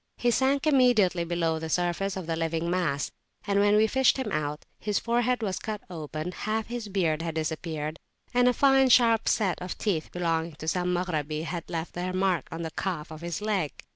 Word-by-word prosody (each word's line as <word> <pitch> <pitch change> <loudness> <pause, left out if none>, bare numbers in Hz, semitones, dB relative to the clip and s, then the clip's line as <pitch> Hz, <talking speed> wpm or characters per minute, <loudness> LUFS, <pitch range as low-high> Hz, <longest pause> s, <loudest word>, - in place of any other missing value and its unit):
He 240 - +2
sank 270 +3 +2
immediately 245 - +4
below 165 -1 0
the 160 0 -5
surface 180 +3 0
of 185 - -5
the 165 0 -1
living 165 +1 -1
mass: 160 -7 0 0.3
and 200 -1 +2
when 205 +1 +4
we 215 +1 +5
fished 265 +4 +3
him 255 -6 -3
out, 150 -1 -2
his 210 -2 -1
forehead 240 +1 +1
was 190 -3 -1
cut 215 -2 -4
open, 155 0 -5
half 215 +3 -2
his 240 -2 -5
beard 170 -6 0
had 165 -1 -3
disappeared, 155 0 -3 0.3
and 245 0 +4
a - - +6
fine 270 0 +4
sharp 230 -3 +5
set 195 -5 +1
[p.192] 180 - -5
of - - -5
teeth 180 -8 -1
belonging 165 -2 -1
to 155 - -8
some 180 +2 +1
Maghrabi 155 -4 -1
had 170 0 -5
left 165 -1 -4
their 180 +1 -3
mark 185 -2 +1
in 165 +1 -4
the 160 - -4
calf 165 -4 -3
of 155 0 -9
his 170 +2 -4
leg. 200 -8 0
180 Hz, 205 wpm, -27 LUFS, 160-215 Hz, 0.3 s, a